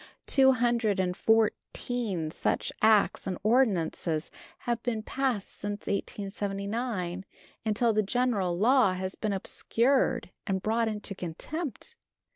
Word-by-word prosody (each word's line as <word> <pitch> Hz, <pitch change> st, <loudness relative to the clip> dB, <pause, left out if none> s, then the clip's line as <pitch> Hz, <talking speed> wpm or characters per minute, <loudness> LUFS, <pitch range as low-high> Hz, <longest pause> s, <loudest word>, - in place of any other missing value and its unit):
Two 265 Hz, -1 st, +5 dB
hundred 235 Hz, -4 st, +1 dB
and 180 Hz, -1 st, 0 dB
fourteen 220 Hz, -4 st, 0 dB
such -, -, -1 dB
acts 215 Hz, -3 st, +4 dB
and 185 Hz, -2 st, -2 dB
ordinances 185 Hz, -9 st, +1 dB, 0.3 s
have 235 Hz, -2 st, -1 dB
been 230 Hz, -3 st, -2 dB
passed 255 Hz, -5 st, -1 dB
since 205 Hz, 0 st, -5 dB
1879, 200 Hz, -1 st, -3 dB, 0.4 s
until 220 Hz, +1 st, +2 dB
the 215 Hz, -, +3 dB
general 205 Hz, -5 st, 0 dB
law 230 Hz, -1 st, +4 dB
has 185 Hz, +1 st, -3 dB
been 215 Hz, -, -2 dB
obscured 230 Hz, +3 st, +1 dB, 0.2 s
and 190 Hz, -2 st, -1 dB
brought 225 Hz, +1 st, +1 dB
into 210 Hz, -2 st, -4 dB
contempt. 280 Hz, -, -5 dB
215 Hz, 115 wpm, -29 LUFS, 190-240 Hz, 0.4 s, Two